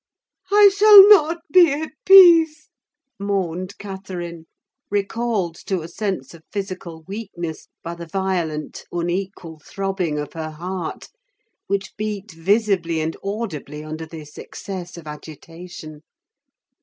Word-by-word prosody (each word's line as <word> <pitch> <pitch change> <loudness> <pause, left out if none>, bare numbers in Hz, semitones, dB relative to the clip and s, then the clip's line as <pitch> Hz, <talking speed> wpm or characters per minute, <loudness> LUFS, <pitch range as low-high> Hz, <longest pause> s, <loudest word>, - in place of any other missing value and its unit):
"I 410 -1 +7
shall 410 -1 +9
not 335 -4 +5
be 350 -3 +6
at 310 +2 -4 0.2
peace," 330 -5 +7 0.5
moaned 190 -2 -3
Catherine, 180 -4 -8 0.4
recalled 205 -2 -1
to 190 -3 -1
a 160 - -7
sense 195 +1 -4
of 170 - -14
physical 185 -5 -6
weakness 190 -4 -7 0.2
by 170 - -5
the 170 0 -9
violent, 170 -4 -3
unequal 175 -1 -4
throbbing 190 -2 -3
of 150 0 -5
her 160 -2 -5
heart, 170 +1 -6 0.6
which 195 0 -3
beat 210 -1 -5
visibly 180 -1 0
and 160 +1 -2
audibly 180 -8 -5
under 155 +1 -7
this 155 -2 -11
excess 180 -3 -8
of 170 - -11
agitation. 155 +1 -10
185 Hz, 120 wpm, -21 LUFS, 165-205 Hz, 0.6 s, shall